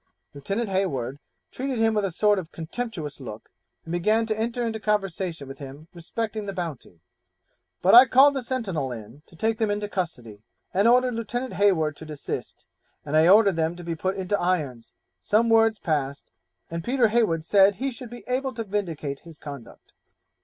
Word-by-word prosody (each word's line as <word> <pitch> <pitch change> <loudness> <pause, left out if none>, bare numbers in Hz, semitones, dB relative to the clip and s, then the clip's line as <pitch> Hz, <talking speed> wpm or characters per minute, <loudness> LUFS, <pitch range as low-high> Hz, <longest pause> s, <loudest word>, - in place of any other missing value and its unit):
Lieutenant 195 +11 -3
Hayward 140 -9 -1 0.3
treated 265 -1 -3
him 225 0 +3
with 210 -1 +1
a - - 0
sort 205 +3 +3
of 170 -3 -8
contemptuous 165 - -5
look, 115 -5 -9 0.3
and 165 - -7
began 215 +6 +2
to 220 -1 -1
enter 235 +2 -1
into 220 -1 -3
conversation 190 -7 -2
with 135 0 -9
him 140 +3 -10
respecting 210 +5 -4
the 195 - -3
Bounty, 155 - -6 0.8
but 185 - +5
I 245 +3 +10
called 270 +4 +6
the 270 - -2
sentinel 200 - -2
in 115 +4 -9
to - - -18
take 220 +5 -1
them 220 -2 +1
into 205 0 -1
custody, 125 - -5 0.3
and 200 +4 +3
ordered 250 +1 +4
Lieutenant 240 +2 -3
Hayward 175 -6 +2
to 160 - -10
desist, 150 -2 -6 0.4
and 150 +1 -2
I 160 +1 +6
ordered 200 -2 +6
them 160 +1 0
to 175 - -9
be 170 0 -3
put 185 +4 -2
into 190 +2 -1
irons; 150 -10 -1 0.3
some 225 +2 +2
words 225 -1 +4
passed, 145 -6 -2 0.4
and 165 0 -4
Peter 245 0 +2
Heywood 210 -9 +1
said 195 +2 +5
he 270 +7 -2
should 245 0 -9
be 240 +1 -10
able 255 0 -1
to 230 - -3
vindicate 165 -9 -3
his 165 -2 -14
conduct. 140 -6 -11
190 Hz, 180 wpm, -25 LUFS, 155-225 Hz, 0.8 s, I